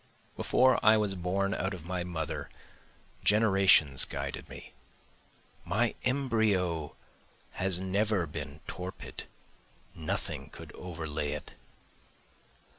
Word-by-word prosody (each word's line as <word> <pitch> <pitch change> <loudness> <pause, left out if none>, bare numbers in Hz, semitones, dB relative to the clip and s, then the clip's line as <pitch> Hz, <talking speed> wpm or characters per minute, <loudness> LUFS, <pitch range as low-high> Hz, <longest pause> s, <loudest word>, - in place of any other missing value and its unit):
Before 130 +1 +3
I 110 0 +7
was 105 -2 +1
born 95 +2 0
out 95 +1 -1
of 85 -3 -11
my 90 0 -2
mother 85 -3 -4 0.7
generations 95 -9 +5
guided - - -4
me, - - -11 0.9
My 110 +7 +1
embryo 110 - +1 0.6
has 95 -2 +1
never 95 0 +1
been 75 0 -7
torpid, 90 0 -7 0.7
nothing 80 -1 -3
could - - -11
overlay 80 -4 -3
it. 75 - -6
95 Hz, 100 wpm, -30 LUFS, 80-105 Hz, 0.9 s, I